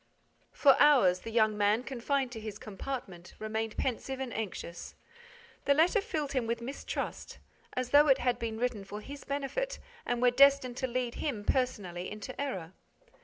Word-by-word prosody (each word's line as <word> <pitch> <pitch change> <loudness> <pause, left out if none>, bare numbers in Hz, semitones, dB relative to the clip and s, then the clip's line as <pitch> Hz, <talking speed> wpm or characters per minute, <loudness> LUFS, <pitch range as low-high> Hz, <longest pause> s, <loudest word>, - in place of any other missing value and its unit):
For 275 -2 +5
hours, 250 -12 +6
the 225 - -7
young 220 -2 +3
man, 210 +3 +2
confined 265 0 -1
to 230 - -6
his 215 -2 -6
compartment, 200 -4 -7
remained 220 0 -3
pensive 265 +1 -2
and 260 -3 -4
anxious. 190 -5 -5 0.7
The 280 - +4
letter 345 +7 +4
filled 310 -10 -3
him 255 -4 -1
with 235 0 -1
mistrust, 255 +4 -5 0.4
as 255 -1 -3
though 290 +1 +7
it 270 -2 +6
had 245 -2 0
been 225 -2 -3
written 235 -4 -1
for 205 +2 -7
his 280 +5 -9
benefit 285 - -2 0.3
and 245 - -1
were 245 0 +4
destined 275 -1 +5
to 260 - -1
lead 245 -1 -2
him, 240 -9 -2
personally, 190 -10 -1
into 215 +6 -6
error. 190 - -4
245 Hz, 170 wpm, -31 LUFS, 215-275 Hz, 0.7 s, though